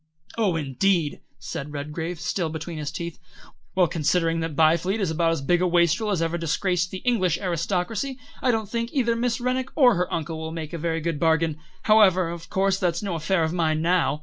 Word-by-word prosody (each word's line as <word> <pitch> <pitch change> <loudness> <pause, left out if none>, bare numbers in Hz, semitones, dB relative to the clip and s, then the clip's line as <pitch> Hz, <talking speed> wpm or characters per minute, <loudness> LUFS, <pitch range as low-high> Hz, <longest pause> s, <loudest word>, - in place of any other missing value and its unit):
"Oh, 210 -7 +1
indeed!" 160 +2 0 0.2
said 145 +2 -6
Redgrave, 155 +4 -4
still 160 +1 -1
between 160 +1 -5
his 150 -1 -3
teeth. 170 +1 -6 0.6
"Well, 185 -1 +5
considering 165 +1 +1
that 165 -2 -3
Byfleet 165 +7 +3
is 190 -6 0
about 165 +1 +1
as 160 -4 -2
big 175 +5 +2
a 180 - +3
wastrel 175 +4 +2
as 180 -5 +1
ever 165 +1 -1
disgraced 175 +2 0
the 190 - -7
English 185 -9 +2
aristocracy, 190 - -2 0.2
I 255 - +2
don't 220 -3 +1
think 230 +2 -2
either 240 -4 +2
Miss 235 0 0
Rennick 255 +1 -1
or 255 -6 +6
her 180 -2 -1
uncle 160 0 -3
will 160 0 -5
make 160 -1 -6
a 170 - -4
very 165 0 -1
good 165 -2 -2
bargain. 160 -1 +2 0.2
However, 190 -5 +5
of 170 -1 -8
course 195 0 +1
that's 175 0 0
no 195 -3 -2
affair 165 +2 +1
of 160 +1 -1
mine 160 -2 +1
now. 170 -3 +2
170 Hz, 200 wpm, -24 LUFS, 160-195 Hz, 0.6 s, or